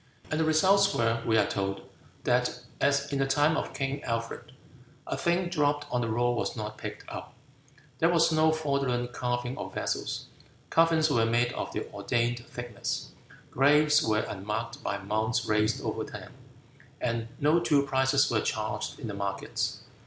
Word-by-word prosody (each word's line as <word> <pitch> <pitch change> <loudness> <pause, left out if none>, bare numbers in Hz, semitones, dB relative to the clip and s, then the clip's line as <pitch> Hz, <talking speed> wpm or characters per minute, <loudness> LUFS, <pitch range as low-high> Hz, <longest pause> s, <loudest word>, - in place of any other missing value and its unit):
And 155 - 0
the - - +3
results 190 +6 +4
were, 115 0 +1
we 110 -1 +4
are - - +4
told, 100 0 -2 0.4
that, - - +1 0.2
as 140 +1 +1
in 140 - 0
the 135 - +2
time 145 +4 +3
of - - -3
King 135 +1 -2
Alfred, 115 0 -4 0.5
a - - -2
thing 175 +1 +1
dropped 145 -4 +1
on 125 - +1
the 115 - -1
road 120 +2 +2
was 120 - -2
not 105 -1 -5
picked - - -7
up; - - -8 0.6
there 165 - +4
was 170 -1 +4
no 160 0 +4
fraudulent 140 -6 -1
carving 125 0 -2
of - - -6
vessels; - - -2 0.5
coffins 165 -2 +4
were 115 -4 +3
made 120 +1 +2
of - - -4
the - - -3
ordained 120 0 0
thickness; 120 -4 -4 0.4
graves 150 +3 +5
were 110 -6 +1
unmarked 105 +4 -4
by 100 - -2
mounds 110 +4 -1
raised 110 +5 +1
over 110 -1 -2
them; 105 -3 -9 0.7
and 115 -1 -1
no 150 +4 +4
two 145 -4 +3
prices 135 +1 +3
were 110 -2 +2
charged 110 -1 -2
in 130 - -5
the 105 - -4
markets. 100 0 -3
125 Hz, 165 wpm, -29 LUFS, 115-150 Hz, 0.7 s, graves